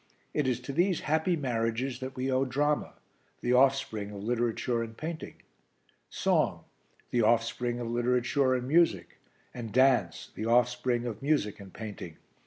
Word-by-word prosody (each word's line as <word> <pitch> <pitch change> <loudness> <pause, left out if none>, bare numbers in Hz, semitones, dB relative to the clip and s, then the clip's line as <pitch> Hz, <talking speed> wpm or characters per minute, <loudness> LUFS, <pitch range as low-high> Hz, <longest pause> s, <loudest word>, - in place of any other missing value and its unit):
It 150 -3 0
is 125 -2 0
to 130 +2 -6
these 175 +3 +2
happy 160 +4 +1
marriages 125 -2 -1
that 130 0 -6
we 130 +1 -1
owe 130 +1 +2
drama 145 +3 0 0.5
the 120 - +1
offspring 125 -6 +2
of 100 -1 -8
literature 120 +1 0
and 115 -1 -6
painting; 160 0 -6 0.7
song - - +1 0.5
the 120 - +2
offspring 120 +2 +1
of 120 - -3
literature 125 +3 +1
and 125 0 -3
music; 135 - +2 0.3
and 115 -3 -6
dance 125 -8 +2
the 110 - -4
offspring 120 0 +2
of 120 0 -5
music 135 -9 0
and 100 -1 -11
painting. 100 -7 -8
125 Hz, 150 wpm, -29 LUFS, 115-135 Hz, 0.7 s, these